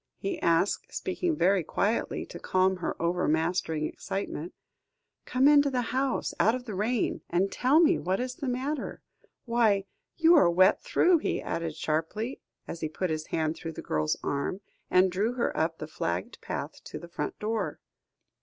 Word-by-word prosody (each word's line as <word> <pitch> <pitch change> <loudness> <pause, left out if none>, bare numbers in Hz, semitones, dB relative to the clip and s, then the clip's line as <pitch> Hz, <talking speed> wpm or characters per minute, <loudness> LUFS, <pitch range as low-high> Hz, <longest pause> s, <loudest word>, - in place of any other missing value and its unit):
he 370 -5 -4
asked, 170 +4 +1
speaking 345 -3 -1
very 190 - +3
quietly, 210 +8 -1
to - - -9
calm 185 0 +2
her 180 - -4
overmastering 165 -2 0
excitement; 180 -2 -4 0.7
"come 260 +2 +3
into 290 -1 +6
the 250 -3 -2
house 265 0 0
out 220 +3 +4
of 250 -1 -6
the 220 - -5
rain, 215 +5 0
and 185 +3 +1
tell 270 +5 +3
me 335 0 +4
what 185 +2 -1
is 250 0 -2
the 275 - -5
matter. 265 +4 -3 0.4
Why, 225 -5 +2 0.3
you 335 +1 +6
are 180 - +6
wet 185 +3 +4
through," 365 -8 +3
he - - -1
added 165 -2 -3
sharply, 165 - -2 0.3
as 170 - -6
he 155 - -1
put 175 +2 -2
his 155 0 -3
hand 160 0 -1
through 165 -1 -6
the - - -8
girl's 75 0 0
arm, 140 +7 -2 0.3
and 185 0 +4
drew 205 +6 0
her 245 -1 -1
up 165 +1 0
the - - -5
flagged 90 - -4
path - - -5
to - - -7
the 170 - -9
front 170 - -4
door. 220 +1 -2
195 Hz, 175 wpm, -28 LUFS, 165-255 Hz, 0.7 s, into